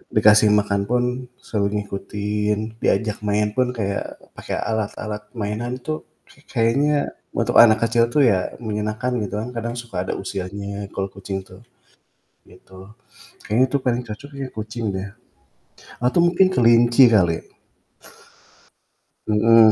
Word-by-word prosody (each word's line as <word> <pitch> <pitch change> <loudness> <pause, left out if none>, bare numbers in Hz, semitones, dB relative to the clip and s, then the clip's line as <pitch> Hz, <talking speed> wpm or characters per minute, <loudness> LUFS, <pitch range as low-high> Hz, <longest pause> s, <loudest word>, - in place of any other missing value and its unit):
dikasih 105 0 +6
makan 105 -1 +2
pun 125 0 +2 0.3
suruh 100 -2 -2
ngikutin, 105 +2 -3
diajak 110 -2 0
main 105 0 0
pun 125 0 +1
kayak 100 -3 -3 0.2
pake - - -5
alat-alat 105 -1 -3
mainan 115 +3 -3
tuh 155 0 -4 0.2
ka - - -21 0.2
kayaknya 145 +6 +2 0.2
untuk - - +3
anak 110 -2 +6
kecil 115 0 +3
tuh 145 +3 +3
ya 95 -6 +1
menyenangkan 110 +3 -2
gitu 105 0 -4
kan, 115 +3 -4
kadang 115 +1 -3
suka 115 -7 -4
ada - - -1
usilnya 100 +1 -5
kalau 95 0 -1
kucing 95 0 -6
tuh, 95 +4 -15 0.9
gitu. 95 +1 -15 0.6
Kayaknya 115 +5 +3
itu 140 - +1
paling 125 -1 +1
cocok 140 +7 -8
ya 130 - -4
kucing 110 +2 -6
deh. 95 +1 -4 1.0
Atau, 125 +8 +2
mungkin 180 +2 +4
kelinci 120 -1 +5
kali. 85 -5 +3 1.9
Heeh. 110 +1 +6
110 Hz, 130 wpm, -22 LUFS, 100-120 Hz, 1.9 s, dikasih